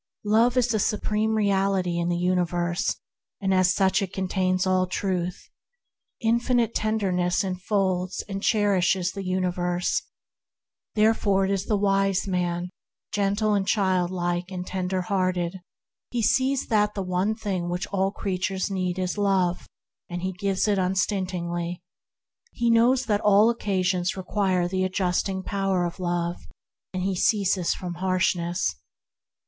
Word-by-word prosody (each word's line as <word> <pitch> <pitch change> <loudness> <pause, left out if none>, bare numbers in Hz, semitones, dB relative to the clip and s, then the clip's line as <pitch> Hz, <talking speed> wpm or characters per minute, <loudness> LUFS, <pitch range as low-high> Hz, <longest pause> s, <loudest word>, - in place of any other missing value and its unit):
Love 230 +4 +3
is 245 -1 +3
the 220 -2 +1
Supreme 215 +1 0
Reality 195 -4 +1
in 170 0 0
the 175 - 0
universe, 175 +2 0 0.4
and 195 -1 0
as 185 -1 +4
such 190 +1 +2
it 190 -2 -3
contains 185 -1 0
all 185 0 +2
Truth. 180 -1 -3 0.7
Infinite 235 0 +2
Tenderness 190 -4 0
enfolds 185 -1 -1
and 195 -1 -4
cherishes 190 -4 +2
the 195 - -6
universe; 180 -1 0 0.9
therefore 210 -3 +3
is 195 0 -1
the 210 - +2
wise 195 -1 +1
man 180 -1 -1 0.4
gentle 205 +1 +1
and 195 -1 0
childlike 180 -3 0
and 180 -1 -5
tender 185 0 -2
hearted. 185 -1 -1 0.5
He 240 -2 -2
sees 265 +3 +2
that 210 -2 +2
the 195 - -2
one 185 +4 0
thing 190 -6 -3 0.2
all 195 -1 +1
creatures 190 0 -2
need 185 -2 -1
is 185 +2 -2
Love, 190 -3 +1 0.4
and 175 0 -5
he 190 - -1
gives 195 +2 0
unstintingly. 180 -3 -1 0.7
He 235 0 +1
knows 245 +3 +4
that 210 -2 +1
all 210 +2 +5
occasions 185 -5 -1
require 185 -2 0
the 185 +1 -1
adjusting 185 0 -1
power 195 -3 0
of 175 +2 -5
Love, 175 -1 -1 0.5
and 185 -1 -3
he 190 0 0
ceases 190 -2 +2
from 180 -2 -5
harshness. 185 -1 0
190 Hz, 130 wpm, -25 LUFS, 180-205 Hz, 0.9 s, all